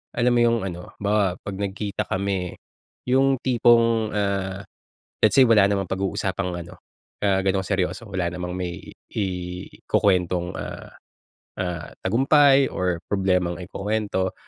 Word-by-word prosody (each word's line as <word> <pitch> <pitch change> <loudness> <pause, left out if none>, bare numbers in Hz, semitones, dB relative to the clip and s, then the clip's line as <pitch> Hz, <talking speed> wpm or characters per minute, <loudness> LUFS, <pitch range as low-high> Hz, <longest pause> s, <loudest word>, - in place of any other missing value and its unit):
Alam 120 +1 +2
mo - - +4
'yung 115 0 +3
ano, 90 -1 -8
halimbawa 100 -3 +1
'pag 100 -1 -6
nagkita 100 +1 -3
kami 95 -2 -2 0.6
'yung 135 +1 +3
tipong, 115 -3 +3
ah, 100 -2 -1 0.6
let's 110 - +5
say 135 -2 +7
wala 110 -4 +6
namang 100 -2 0
pag-uusapang 95 -1 -2
ano, 85 0 -10 0.4
ah, 100 -2 +3
gano'ng 95 0 0
seryoso. 95 +5 -1
Wala 90 -3 -1
namang 90 0 -4
may 90 -2 -5 0.2
ikukuwentong, 90 -1 -1
ah, - - -7 0.7
ah, 85 -4 -4
tagumpay 135 +5 +4
or 90 -2 0
problemang 90 -2 0
ikukuwento. 100 0 -2
95 Hz, 125 wpm, -24 LUFS, 90-110 Hz, 0.7 s, say